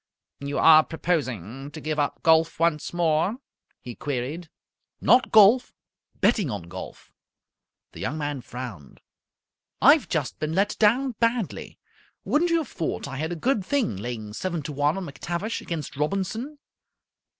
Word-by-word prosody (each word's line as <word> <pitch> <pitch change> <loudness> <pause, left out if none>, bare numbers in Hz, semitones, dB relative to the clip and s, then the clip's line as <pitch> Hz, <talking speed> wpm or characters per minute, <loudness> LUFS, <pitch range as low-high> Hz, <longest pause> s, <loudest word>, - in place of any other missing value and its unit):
"You 140 0 -4
are 155 -1 +7
proposing 135 - -3
to 150 +2 -9
give 155 0 -3
up 145 - -1
golf 160 0 +3
once 165 -3 +1
more?" 175 +5 +1 0.4
he 120 - -8
queried. 145 +6 -4 0.5
"Not 250 0 +4
golf. 220 +4 +6 0.4
Betting 205 - +2
on 100 -6 -4
golf." 85 - -10 0.8
The - - -12
Young 150 - -3
Man 145 -3 -3
frowned. 120 - -9 0.8
"I've - - +5
just - - -2
been 155 +1 -2
let 200 +2 +1
down 245 +5 +3
badly. 230 -3 -1 0.5
Wouldn't 340 +4 +2
you 335 - +3
have 315 -5 -2
thought 160 -7 -4
I 135 -1 -6
had 160 +4 -3
a - - -2
good 225 - 0
thing, 260 - 0
laying 110 0 -6
seven 170 - -3
to 150 - -5
one 145 +4 +1
on 190 - -4
McTavish 175 +9 -4
against 160 -5 -5
Robinson?" 195 - -2
160 Hz, 150 wpm, -25 LUFS, 140-200 Hz, 0.8 s, are